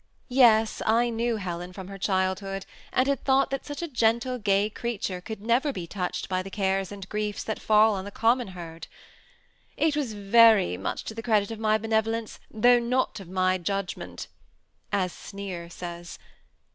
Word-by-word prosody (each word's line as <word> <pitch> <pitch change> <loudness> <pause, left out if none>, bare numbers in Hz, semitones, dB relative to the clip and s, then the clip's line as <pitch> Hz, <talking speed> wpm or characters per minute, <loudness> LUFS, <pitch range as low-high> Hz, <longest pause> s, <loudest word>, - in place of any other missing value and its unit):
Yes, 230 -4 +4
I 235 +2 +3
knew 230 0 0
Helen 180 -2 -5
from 190 -1 -8
her 195 0 -9
childhood, 190 0 -1 0.3
and 255 - +2
had 280 0 0
thought 270 0 +3
that 275 - -3
such 290 +3 -5
a - - -2
gentle, 245 -1 +1
gay 200 -1 +2
creature 210 -4 -4
could 215 +2 -7
never 245 +6 +2
be 180 -9 -5
touched 180 0 -3
by 185 -1 -1
the 190 - -8
cares 195 -1 -1
and 195 -2 -8
griefs 210 0 -3
that 220 - -4
fall 215 0 +4
on 190 -1 -3
the 200 - -6
common 235 +3 +2
herd. 165 -1 -8 0.5
*' - - -37
It 300 - +1
was 275 -7 -2
very 210 - +5
much 95 +1 -4
to - - -6
the 225 - -6
credit 215 -2 +1
of 225 - -6
my 215 -1 +3
benevolence, 225 +1 -1
though 245 +3 +4
not 250 0 0
of 190 -3 -11
my 185 0 +1
judgment," 195 +1 -4 0.6
as 185 -3 0
Sneer 190 -4 -7
says. 175 -1 -8
210 Hz, 180 wpm, -26 LUFS, 190-230 Hz, 0.6 s, very